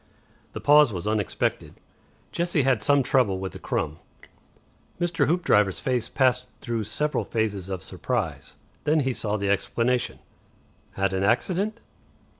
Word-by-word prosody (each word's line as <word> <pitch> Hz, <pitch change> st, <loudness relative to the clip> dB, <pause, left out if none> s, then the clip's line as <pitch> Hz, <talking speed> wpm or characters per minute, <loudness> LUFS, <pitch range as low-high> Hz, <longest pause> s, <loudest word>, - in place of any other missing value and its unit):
The -, -, -5 dB
pause 145 Hz, -3 st, +6 dB
was 90 Hz, -1 st, -5 dB
unexpected. 105 Hz, -2 st, -1 dB, 0.6 s
Jessie 170 Hz, -4 st, 0 dB
had 130 Hz, -4 st, +2 dB
some 140 Hz, +4 st, +3 dB
trouble 120 Hz, -8 st, +2 dB
with 95 Hz, 0 st, -5 dB
a -, -, -9 dB
crumb. 75 Hz, +2 st, -2 dB, 1.0 s
Mr. 170 Hz, -4 st, +1 dB
Hoopdriver's 105 Hz, -, +2 dB
face 125 Hz, -3 st, -1 dB
passed 125 Hz, -2 st, +2 dB
through 115 Hz, -2 st, -3 dB
several 150 Hz, +8 st, -1 dB
phases 105 Hz, -4 st, -2 dB
of 95 Hz, -2 st, -4 dB
surprise. 95 Hz, -, -4 dB, 0.3 s
Then 155 Hz, +1 st, +3 dB
he 130 Hz, -1 st, 0 dB
saw 105 Hz, -2 st, -2 dB
the 100 Hz, -1 st, -1 dB
explanation. 120 Hz, +5 st, 0 dB, 0.8 s
"Had 95 Hz, 0 st, 0 dB
an 95 Hz, -, 0 dB
accident?" 190 Hz, -, 0 dB
120 Hz, 135 wpm, -25 LUFS, 100-145 Hz, 1.0 s, pause